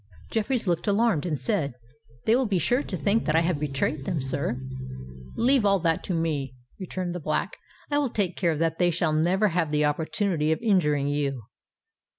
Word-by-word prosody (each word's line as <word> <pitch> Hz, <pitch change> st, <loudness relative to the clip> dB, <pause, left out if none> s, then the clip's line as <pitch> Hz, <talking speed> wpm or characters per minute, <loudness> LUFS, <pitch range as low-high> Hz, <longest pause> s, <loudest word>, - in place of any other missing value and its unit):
Jeffreys 225 Hz, +2 st, 0 dB
looked 175 Hz, +2 st, 0 dB
alarmed 205 Hz, -5 st, +2 dB
and 150 Hz, -5 st, -2 dB
said, 160 Hz, -, -1 dB, 0.5 s
"They 225 Hz, -, +4 dB
will 255 Hz, -1 st, +2 dB
be 195 Hz, -3 st, +1 dB
sure 240 Hz, -, +2 dB
to 190 Hz, -, -4 dB
think 200 Hz, +9 st, +1 dB
that 155 Hz, -, +1 dB
I 165 Hz, -, +5 dB
have 170 Hz, -3 st, 0 dB
betrayed 145 Hz, 0 st, -1 dB
them, 170 Hz, +1 st, -2 dB
sir." 130 Hz, -2 st, -1 dB, 0.8 s
"Leave 255 Hz, 0 st, +3 dB
all 200 Hz, -1 st, +4 dB
that 165 Hz, -1 st, +1 dB
to 185 Hz, -, -2 dB
me," 145 Hz, -6 st, -1 dB, 0.2 s
returned 185 Hz, -1 st, -4 dB
the 180 Hz, -, -4 dB
Black. 155 Hz, +5 st, -2 dB, 0.4 s
"I 290 Hz, -, +3 dB
will 285 Hz, -3 st, 0 dB
take 195 Hz, -6 st, -1 dB
care 170 Hz, -4 st, +1 dB
that 165 Hz, 0 st, 0 dB
they 175 Hz, -1 st, +4 dB
shall 165 Hz, -2 st, 0 dB
never 180 Hz, +7 st, +2 dB
have 165 Hz, -2 st, 0 dB
the 150 Hz, 0 st, +2 dB
opportunity 160 Hz, +1 st, 0 dB
of 160 Hz, -, +1 dB
injuring 150 Hz, -10 st, +2 dB
you. 140 Hz, -4 st, -1 dB
170 Hz, 190 wpm, -26 LUFS, 150-200 Hz, 0.8 s, I